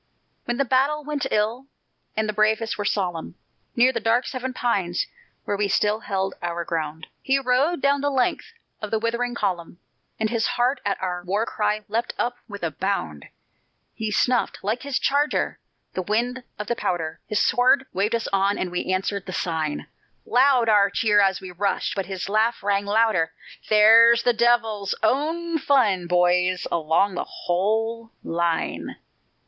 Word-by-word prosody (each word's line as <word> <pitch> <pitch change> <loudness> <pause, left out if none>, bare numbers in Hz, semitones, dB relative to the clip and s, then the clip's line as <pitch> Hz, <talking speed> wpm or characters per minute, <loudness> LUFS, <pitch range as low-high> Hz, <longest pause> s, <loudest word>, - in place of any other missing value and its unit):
When 240 0 -2
the 275 - +1
battle 275 +4 +1
went 295 -1 -2
ill, 225 +5 -1 0.5
and 220 0 +1
the 215 - -2
bravest 220 +2 +1
were 205 - -4
solemn, 180 -5 -2 0.4
Near 250 +2 +4
the - - -1
dark 230 +3 +2
Seven 260 0 -4
Pines, 195 -9 -1 0.4
where 205 - -1
we 200 0 0
still 210 +2 +1
held 195 -2 -2
our 170 0 -3
ground, 160 -1 -3 0.2
He 270 0 +2
rode 270 +5 +1
down 280 0 +3
the 285 - +1
length 260 -3 0 0.3
of 210 - -4
the 220 - +1
withering 235 +2 -1
column, 175 -6 -3 0.4
And 220 0 0
his 230 -2 +1
heart 250 +3 0
at 200 0 -1
our 180 -1 -3
war 200 +5 0
cry 210 -1 -1
leapt 225 +3 -2
up 245 0 -1
with 205 -4 -9
a 165 - -1
bound; 145 - -3 0.7
He 220 -1 -3
snuffed, 245 +3 0
like 215 +5 -1
his 280 -2 -2
charger, 290 +2 0 0.3
the 185 - -2
wind 235 +7 -1 0.2
of 210 - -4
the 235 - -1
powder, 165 -7 -3
His 210 - -1
sword 255 +2 +3
waved 205 +5 +1
us 230 - -2
on 195 +1 +2
and 180 - -3
we 180 +1 -2
answered 195 +1 -2
the 185 - -5
sign; 160 -5 -2 0.4
Loud 255 -2 +4
our 205 -2 +5
cheer 210 -2 +3
as 195 -1 +2
we 185 - -8
rushed, 195 +3 -1
but 195 -3 -3
his 190 -2 -4
laugh 220 +3 +1
rang 200 0 +1
the 200 - -4
louder. 210 -8 +2 0.4
"There's 230 +2 +7
the 245 - +3
devil's 225 -4 +1
own 320 +8 0
fun, 215 -11 +2
boys, 180 +1 +2
along 165 +4 +1
the 180 - -2
whole 225 +5 -1
line!" 170 0 -2
215 Hz, 170 wpm, -23 LUFS, 185-240 Hz, 0.7 s, There's